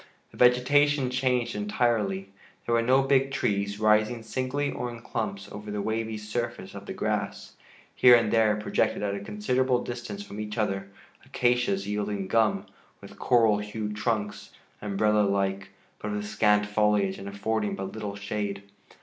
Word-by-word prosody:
The - - -15
vegetation 130 +2 +4
changed 125 -2 0
entirely. 105 -2 0 0.4
There 120 - 0
were 115 - +4
no 130 +3 +4
big 135 0 +3
trees, 100 -6 -1
rising 110 +2 +2
singly 130 +5 -2
or 125 - -4
in 120 -1 -8
clumps 100 -3 -4
over 105 +1 -8
the 105 0 -3
wavy 110 +1 -2
surface 110 +3 -4
of - - -9
the - - -4
grass. - - -3 0.4
Here 125 -1 +7
and 115 -3 +2
there 110 -2 +4
projected 105 -1 0
at 100 -1 -1
a 100 - -3
considerable 125 +5 0
distance 125 +12 -6
from 105 - -9
each 105 +1 -5
other 100 -3 -1 0.4
acacias 120 -5 +1
yielding 105 -1 -2
gum, 110 +1 +2 0.3
with - - -13
coral 115 -4 +4
hued 105 0 -4
trunks, 105 -1 -2 0.3
umbrella 105 +1 +2
like, 100 -1 0 0.3
but 105 - -4
with 105 0 -3
scant 105 0 +2
foliage 105 -2 +1
and 100 - -6
affording 105 +1 -1
but 95 0 -5
little 105 -2 -5
shade. 100 0 -4
105 Hz, 160 wpm, -27 LUFS, 105-120 Hz, 0.4 s, Here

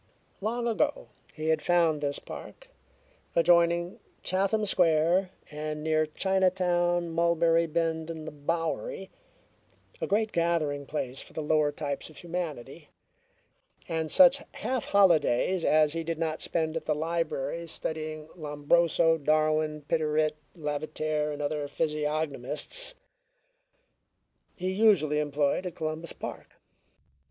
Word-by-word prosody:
Long 235 +3 -1
ago - - 0 0.3
he 155 +1 -2
had 160 -1 +2
found 165 -2 +2
this 145 -1 -1
park, - - -10 0.7
adjoining 170 +1 +3 0.2
Chatham 195 +3 +1
Square 175 0 +3 0.2
and 150 0 -4
near 155 0 +2
Chinatown, 175 -1 +1
Mulberry 170 0 +3
Bend 160 0 -1
and 160 -2 -6
the - - -5
Bowery, 165 - -3 0.9
a - - -1
great 215 +2 +1
gathering 155 -5 0
place 135 -3 -3
for - - -14
the 155 - -4
lower 150 -1 +2
types 145 -1 -4
of 155 - -16
humanity, 160 -4 -5 1.0
and 160 -1 -2
such 275 - +6
half 260 -2 -2
holidays 185 -3 +3
as 155 -1 +4
he 165 0 -2
did 165 0 -3
not 160 -1 -2
spend 160 -1 -1
at 165 - -3
the 155 - +1
library 165 0 -2
studying 155 -1 -4
Lombroso, 165 +1 +2
Darwin, 155 0 +1
Piderit, 155 0 +1 0.2
Lavater, 150 0 -2
and 145 0 -4
other 145 0 -2
physiognomists, 150 - -2 1.6
he 185 +1 -2
usually 190 -8 +3
employed 150 +4 0
at 175 - -7
Columbus 155 +1 -3
Park. - - -8
160 Hz, 120 wpm, -28 LUFS, 150-175 Hz, 1.6 s, such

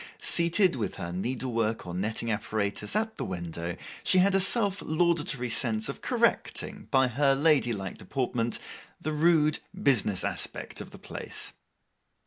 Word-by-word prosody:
Seated, 170 +1 +4
with 115 -5 -3
her 85 - -5
needlework 115 +2 -2
or 90 - -6
netting 110 +5 -1
apparatus, 105 - -2
at 220 +1 -1
the - - -3
window, 85 -1 -5 0.3
she 185 - +3
had 190 +2 +4
a 195 - +4
self 200 0 +3
laudatory 155 -6 +1
sense 110 -2 +1
of - - -6
correcting, - - 0
by 130 -1 +4
her 135 +3 +2
ladylike 120 - +1
deportment, 120 -3 -1 0.4
the 155 - -3
rude 155 -1 +3 0.2
business 105 -8 +3
aspect - - -3
of - - -9
the - - -12
place. - - -4
125 Hz, 140 wpm, -28 LUFS, 105-160 Hz, 0.4 s, Seated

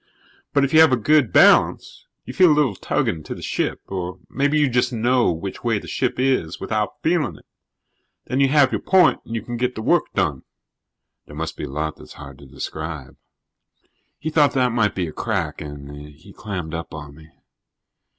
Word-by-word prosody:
But 140 - +2
if 140 - -5
you 160 - +7
have 160 -3 +7
a 130 - +3
good 145 +1 +3
balance, - - +3 0.2
you - - -7
feel 180 -3 +5
a - - +4
little 140 -8 +2
tugging 85 -3 -2
to - - -7
the - - -10
ship, - - -2
or 90 -1 -5
maybe 145 +2 +1
you 150 -1 +3
just 125 0 +1
know 120 -1 +2
which 85 +4 -6
way 115 -3 +1
the - - -8
ship 125 -1 -1
is 130 -11 0
without 105 -2 -3
feeling 160 - +1
it. - - -20 0.8
Then 130 - -2
you 140 - +5
have 140 -1 +4
your - - -2
point 185 -3 +4
and 115 - -6
you 115 - -3
can 120 0 -5
get 125 +1 -1
the 110 - -5
work - - +3
done." 65 -2 0 0.9
"There 75 - -12
must 80 +1 -4
be - - -5
a - - -8
lot 75 +3 -3
that's - - -13
hard 70 -2 -12
to 70 - -14
describe." 75 +1 -7 1.0
He 155 - -4
thought 145 -3 +3
that 125 -2 +2
might 110 -3 +1
be 90 - -1
a 80 - -7
crack - - -3
and 75 -1 -8 0.2
he 75 - -16
clammed 90 -7 -6
up 85 0 -6
on 75 -2 -9
me. 80 +2 -16
110 Hz, 205 wpm, -21 LUFS, 80-135 Hz, 1.0 s, you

